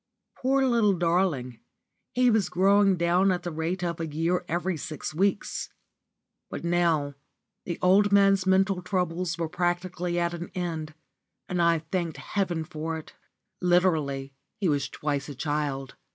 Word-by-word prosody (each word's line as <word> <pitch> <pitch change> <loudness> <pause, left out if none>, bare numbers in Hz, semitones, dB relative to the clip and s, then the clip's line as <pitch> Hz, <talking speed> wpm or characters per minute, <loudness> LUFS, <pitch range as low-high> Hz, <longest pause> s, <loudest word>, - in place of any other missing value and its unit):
Poor 270 +1 +2
little 230 -5 +3
darling, 165 -8 0 0.6
he 250 -1 +4
was 215 -3 +2
growing 195 +1 +4
down 175 +3 +3
at 175 -1 -2
the 175 - -3
rate 165 +3 -2
of 170 -2 -2
a 165 - -2
year 165 +4 0
every 175 +2 -1
six 155 0 -5
weeks. 195 +5 -1 0.8
But - - -6
now 170 -4 +1 0.5
the 170 - -3
old 200 +3 +5
man's 195 -1 +4
mental 190 0 +3
troubles 180 -2 -1
were 165 -1 -1
practically 175 +1 -1
at 170 0 0
an 170 0 -6
end, 160 -4 -4 0.5
and 180 -1 -1
I 170 0 +4
thanked 170 -4 -1
heaven 180 -5 -2
for 160 +1 -4
it. 160 - -11 0.5
Literally 160 -7 +1 0.2
he 195 - 0
was 145 -3 0
twice 145 -1 -3
a 145 - -7
child. 145 -2 -2
175 Hz, 150 wpm, -27 LUFS, 160-190 Hz, 0.8 s, old